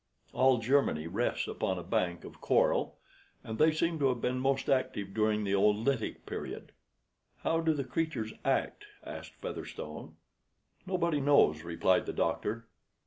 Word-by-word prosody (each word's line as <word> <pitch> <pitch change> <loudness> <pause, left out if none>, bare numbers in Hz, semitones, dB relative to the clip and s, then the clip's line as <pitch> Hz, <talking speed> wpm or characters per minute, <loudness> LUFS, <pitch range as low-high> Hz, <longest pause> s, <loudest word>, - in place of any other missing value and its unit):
All 130 -1 +4
Germany 115 - +2
rests 100 +9 -1
upon 95 - -2
a 90 - -5
bank 85 0 -1
of - - -12
coral; - - +2 0.5
and 110 0 -6
they 160 +1 +6
seem 165 +1 0
to 140 - +3
have 125 -2 -1
been 125 +2 -1
most 135 +1 0
active 130 -7 0
during 110 0 +1
the 100 - -2
Oolitic 105 +5 +1
Period." - - -6 0.7
"How 165 - +2
do 165 -1 +2
the 145 -3 -1
creatures 145 -7 -2
act?" 135 - 0 0.2
asked - - -8
Featherstone. - - -7 0.7
"Nobody 170 -5 0
knows," 135 - +4
replied 85 +2 +1
the - - -3
doctor. 115 +2 -1
125 Hz, 145 wpm, -31 LUFS, 105-140 Hz, 0.7 s, they